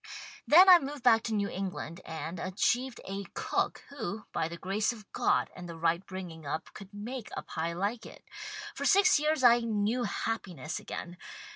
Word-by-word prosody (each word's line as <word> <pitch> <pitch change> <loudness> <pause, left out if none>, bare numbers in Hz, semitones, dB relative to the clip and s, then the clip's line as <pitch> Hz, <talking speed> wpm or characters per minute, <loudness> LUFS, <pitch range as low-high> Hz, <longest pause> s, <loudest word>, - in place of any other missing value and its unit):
Then 360 +5 +8
I 360 -2 +10
moved 280 -2 -6
back 225 -3 +6
to 225 - -2
New 200 -1 +1
England 185 -3 -5
and, 160 +2 -5
achieved 240 +8 0
a 195 +1 -4
cook - - -1
who, 220 -7 -5
by 160 - 0
the 170 +1 -7
grace 200 +5 0
of 220 -3 -11
God - - +1
and 180 -1 -8
the 165 - -7
right 170 +2 +1
bringing 180 -4 -8
up 150 +2 -4
could 195 -1 -11
make 220 +3 -6
a - - -4
pie 165 +1 -3
like 205 +6 -2
it. - - -14 0.5
For - - -5
six 400 -3 +5
years 305 -2 +1
I 240 -1 +7
knew 225 +1 0
happi 215 -4 -3
ness 155 +4 -5
again. 175 0 -7
205 Hz, 185 wpm, -30 LUFS, 175-240 Hz, 0.5 s, I